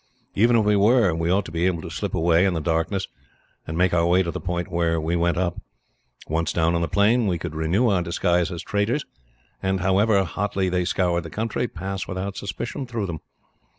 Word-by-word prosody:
Even 115 +4 +4
if 110 - +2
we 105 0 +3
were, 105 -2 +4
we 80 +1 -1
ought 95 +2 +2
to - - -8
be 85 +2 +1
able 85 -3 -1
to - - -7
slip - - -3
away, 85 +1 +3
in 95 -3 +2
the - - 0
darkness, 80 +5 -1 0.6
and 80 - -4
make 90 0 +2
our 85 -1 +3
way 90 +2 +4
to 85 - -3
the - - -6
point 90 0 -3
where 85 -1 +1
we 80 +2 -1
went 85 0 +1
up. 90 -1 -1 0.7
Once 80 +1 -1
down 80 0 +1
on 85 - 0
the 85 - 0
plain, 110 +4 +3
we 90 -3 0
could 85 -1 -6
renew 80 +10 +1
our 95 -5 +2
disguise 85 0 +1
as 85 - -5
traders, 105 +8 -1 0.6
and, 95 -1 0
however 100 +2 +3
hotly 95 +1 -1
they 90 0 0
scoured 90 -2 +1
the 80 - -8
country, 110 +5 -2
pass 95 0 -5
without 95 +1 -4
suspicion 120 +7 -5
through 115 -4 -3
them. 85 -4 -5
90 Hz, 220 wpm, -23 LUFS, 85-100 Hz, 0.7 s, Even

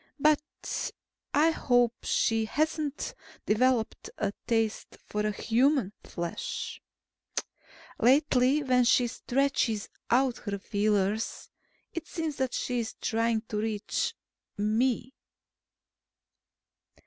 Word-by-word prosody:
But 300 +1 0 0.4
I 310 +3 +4
hope 245 -6 +3
she 225 -1 +2
hasn't 305 +3 -1 0.3
developed 235 +1 +1
a 205 -2 -1
taste 225 -2 0
for 210 0 -1
human 235 +1 +2
flesh. 170 -1 -4 1.2
Lately, 265 +2 +4
when 250 -2 +4
she 245 +1 +4
stretches 245 -3 0 0.2
out 255 0 +3
her 200 -2 -3
feelers, 205 +1 0 0.4
it 335 - -5
seems 320 -4 -3
that 260 -2 -1
she's 245 -2 -2
trying 230 -1 +1
to 210 - -2
reach 220 - -1 0.4
me. 230 +4 +1
240 Hz, 90 wpm, -29 LUFS, 215-275 Hz, 1.2 s, I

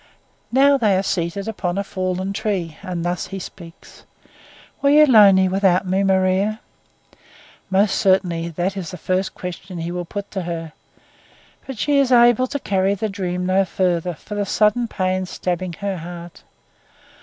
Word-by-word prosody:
Now 275 +2 +4
they 205 -5 +3
are 190 - 0
seated 195 +1 -2
upon 190 -4 -3
a 200 - 0
fallen 185 0 -3
tree, 190 -6 -2
and 180 -3 -4
thus 175 0 -2
he 195 - -6
speaks: 170 -2 -12 0.8
"Were 280 - +3
you 300 +1 +7
lonely 200 -7 +6
without 190 0 +2
me, 190 +2 0
Maria?" 190 +2 +1 1.1
Most 195 +1 +2
surely 175 -3 +1
it 185 +2 -1
is 185 -4 -5
the 180 - -8
first 185 +1 -2
question 180 0 -7
he 170 +1 -4
will 175 0 -4
put 200 +3 -7
to 190 - -3
her; 165 -2 -5 0.9
but 265 -3 -6
she 290 +4 +2
is 270 -2 +2
able 240 +1 +5
to 285 - -3
carry 195 -5 0
the 215 +2 -3
dream 180 -2 -3
no 190 +1 +3
further 180 -2 -1
for 210 - -10
the 205 0 -1
sudden 210 +4 +1
pain 185 -2 -2
stabbing 180 0 -3
her 195 +3 -4
heart. 170 0 -9
190 Hz, 165 wpm, -21 LUFS, 180-205 Hz, 1.1 s, you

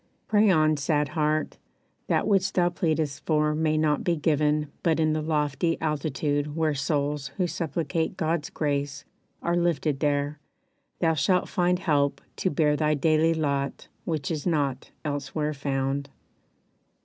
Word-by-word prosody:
Pray 215 0 +4
on, 155 -3 +4
sad 145 0 +1
heart, 155 -1 -1 0.5
That - - +1
which 195 -2 +2
thou 175 -1 +3
pleadest 155 -4 -1
for 150 -1 +2
may 155 0 +1
not 155 -1 +1
be 175 - +1
given 150 -1 +1
But 165 -1 +2
in 155 -1 +2
the 155 - -1
lofty 155 +1 0
altitude 145 -1 -1
where 160 -2 +1
souls 145 0 -1
Who 185 - +2
supplicate 165 +1 -2
God's 160 -2 -1
grace 145 -2 -2 0.4
are 170 - +1
lifted 160 -5 +1
there 145 0 0 0.6
Thou 165 -2 +3
shalt 170 +5 +1
find 180 0 +2
help 145 -6 +1 0.2
to 185 - 0
bear 150 -2 +2
thy 150 0 +1
daily 160 +2 +3
lot 140 -3 -2
Which 155 -3 -2
is 155 -1 -2
not 140 -6 0 0.2
elsewhere 145 +1 -2
found. 135 0 -2
150 Hz, 145 wpm, -26 LUFS, 145-165 Hz, 0.6 s, Pray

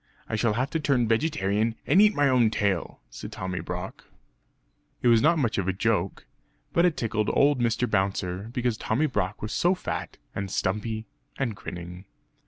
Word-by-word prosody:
I - - -2
shall 110 0 +1
have 130 +5 -1
to 160 - 0
turn 135 -6 +2
vegetarian 115 -4 +1
and 195 - +5
eat 210 0 +5
my 145 -1 +3
own 125 -4 +4
tail!" 100 -5 -1
said - - -8
Tommy 95 -1 -4
Brock. - - -6 1.0
It 120 - +5
was 115 -1 +6
not 165 +6 +4
much 120 -9 0
of 95 - -2
a 95 - +1
joke, 100 -2 -1 0.5
but 170 - +4
it 175 -4 +2
tickled 110 -2 0
old 140 -1 +4
Mr. 120 +1 +1
Bouncer; 95 0 -1
because 120 -2 -1
Tommy 125 +8 0
Brock 105 -9 -2
was 105 - -3
so 180 +2 +3
fat - - -5 0.2
and 100 -1 -4
stumpy 105 +4 -2 0.3
and 120 -6 -1
grinning. 90 0 -8
110 Hz, 180 wpm, -26 LUFS, 100-135 Hz, 1.0 s, was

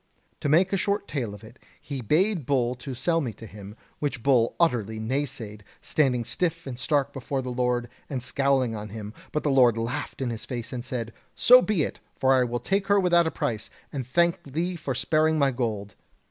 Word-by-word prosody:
To 145 - -1
make 180 +6 +4
a - - +3
short 200 +1 -1
tale 120 -8 -3
of 105 - -14
it, 115 +3 -14 0.2
he 140 -3 -6
bade 165 - +1
Bull 125 -3 +1
sell 140 +6 -1
me 120 -6 -3
to 115 - -11
him, 105 0 -10 0.2
which 140 -6 -2
Bull 125 -4 +3
utterly 115 - +1
naysaid, 110 -3 -3 0.2
standing 125 -6 +1
stiff 165 +7 -1
and 130 -3 -6
stark 140 0 +1
before 135 0 -3
the 125 - -4
Lord, 125 -1 0 0.2
and 130 -4 -3
scowling 130 -1 +1
on 105 -1 -6
him. 105 0 -7 0.2
But 150 - -1
the 145 - +2
Lord 125 -4 +5
laughed 115 +3 -3
in 130 -3 -1
his 110 -1 -6
face 120 -1 -5
and 120 -1 -4
said: 120 -3 -4 0.2
'So 250 +1 +8
be 210 -10 +1
it, - - -4 0.2
for 135 0 +3
I 130 -1 +4
will 120 0 -2
take 195 - 0
her 200 0 +5
without 175 -3 +4
a - - +2
price, 120 -10 -3 0.2
and 130 -4 -4
thank 170 +5 +2
thee 175 +4 -1
for 145 -6 -3
sparing 155 +4 +2
my 140 -2 +3
gold.' 110 -5 -3
130 Hz, 205 wpm, -26 LUFS, 115-155 Hz, 0.2 s, So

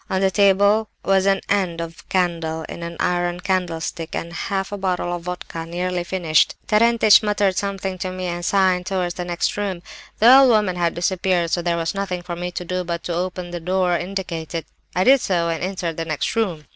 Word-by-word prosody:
On 190 - 0
the 190 0 +2
table 200 +2 +3 0.2
was 195 0 +3
an 195 0 +2
end 185 -5 0
of 165 0 -8
candle 165 -3 -1
in 170 - -8
an 170 0 -6
iron 175 0 0
candlestick, 175 -3 -2
and 170 - -4
a - - -11
half 195 +3 -3
bottle 180 -2 -1
of 175 - -7
vodka, 180 -1 -6
nearly 180 +1 -2
finished. 175 -3 +2
Terentich 220 -1 +5
muttered 205 -3 +1
something 195 -1 -3
to 185 - -3
me, 185 0 -5
and 175 0 -3
signed 185 -1 +2
towards 185 -2 -1
the 180 - -5
next 175 +2 -1
room. 190 -4 -3 0.3
The 240 +4 +8
old 270 -2 +6
woman 210 -5 +3
had 170 -1 0
disappeared, 175 -1 0
so 175 - +1
there 170 0 0
was 165 -1 -1
nothing 190 -3 -3
for 175 -1 -5
me 175 +1 -4
to 180 0 -6
do 180 +1 -2
but 170 -1 -4
to 175 - -3
open 180 0 -3
the 175 - -4
door 180 +1 +1
indicated. 170 -3 -4 0.3
I 180 - +3
did 265 +3 +6
so, 170 -3 0
and 165 +1 -2
entered 180 -3 -3
the 165 - -2
next 155 +5 -2
room. 180 -10 -1
180 Hz, 210 wpm, -21 LUFS, 170-195 Hz, 0.3 s, The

